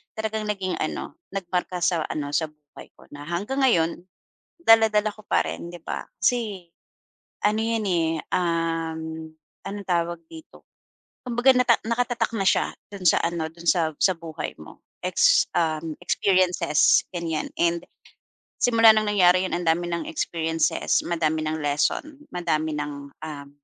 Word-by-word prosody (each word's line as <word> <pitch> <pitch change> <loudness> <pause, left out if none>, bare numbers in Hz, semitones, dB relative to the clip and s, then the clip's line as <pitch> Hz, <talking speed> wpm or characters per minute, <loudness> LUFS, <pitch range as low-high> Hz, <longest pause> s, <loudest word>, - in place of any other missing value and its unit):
talagang 220 0 -3
naging 195 -3 -2
ano, 155 - -4 0.2
nagmarka 180 -1 -2
sa 165 -3 +2
ano, 145 -2 -4
sa 160 - +1
buhay 150 -2 -15
ko - - -19
na 145 0 -9
hanggang 205 +11 -2
ngayon 170 -10 +4 0.7
dala-dala 220 -6 +5
ko 215 - -15
pa 85 - +3
rin, 85 - -6
'di 175 - -9
ba? - - -4 0.2
Kasi 210 -8 0 0.8
ano 215 +1 +2
'yan, 225 -2 -1
eh, 165 -3 +1 0.2
uhm 165 -2 -2 0.4
anong 200 -1 -6
tawag 170 -1 0
dito, 320 -1 -14 0.6
kumbaga 245 +2 +4
nata 250 -2 +5
nakatatak 240 0 0
na 195 - 0
siya - - +2 0.2
do'n 195 -2 -8
sa - - +5
ano, 170 -1 -1
do'n 170 +1 -11
sa 165 -3 +2
sa 190 - +4
buhay 165 -2 -6
mo, 75 - -13 0.3
ex, - - +4
uhm, 160 -1 -1
experiences, 185 -6 +3
ganyan 165 -2 -2
and 170 0 +1 0.8
simula 230 -2 +6
nang 215 -1 +1
nangyari 185 -2 +4
'yon - - -3
andami 175 0 0
ng 170 -1 -3
experiences, 165 0 0
madami 160 -2 0
nang 155 0 -2
lesson, 275 - -1
madami 155 -3 -1
nang, 145 -1 -5 0.2
uhm, 140 -2 -8
170 Hz, 145 wpm, -24 LUFS, 160-210 Hz, 0.8 s, simula